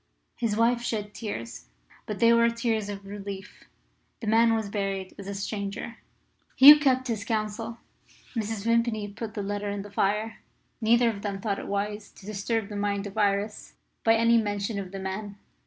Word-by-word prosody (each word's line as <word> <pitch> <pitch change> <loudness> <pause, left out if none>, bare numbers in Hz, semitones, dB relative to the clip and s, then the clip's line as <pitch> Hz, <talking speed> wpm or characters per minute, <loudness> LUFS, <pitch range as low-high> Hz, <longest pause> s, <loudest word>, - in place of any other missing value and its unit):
His 220 -3 -1
wife 235 +1 +3
shed 210 -3 -3
tears, 115 - -6 0.4
but 210 - -3
they 230 0 +5
were 235 0 +5
tears 230 -3 -1
of 200 -1 -6
relief. 200 -1 -8 0.5
The - - -6
man 225 +1 +4
was 220 -2 -2
buried 195 -2 -3
as 195 - -8
a 200 - -4
stranger. 200 +3 -4 0.6
Hugh 295 +3 +11
kept 260 -3 +2
his 220 -4 -2
counsel. 225 +1 -3 0.6
Mrs. 220 -2 -2
Vimpany 230 -2 +1
put 215 +2 -7
the 205 - -2
letter 205 +1 -3
in 200 -1 -3
the 205 - -11
fire. 210 +3 0 0.4
Neither 235 +1 +4
of 200 -2 -8
them 200 -2 -3
thought 200 -1 -2
it - - -7
wise 205 +1 -3
to 190 - -15
disturb 215 +1 -2
the 205 - -6
mind 200 0 -1
of 200 - -7
Iris 205 0 0 0.3
by 225 0 +5
any 230 +1 +4
mention 205 0 -2
of 190 -2 -6
the 195 - -6
man. 195 +2 -5
210 Hz, 180 wpm, -27 LUFS, 200-230 Hz, 0.6 s, Hugh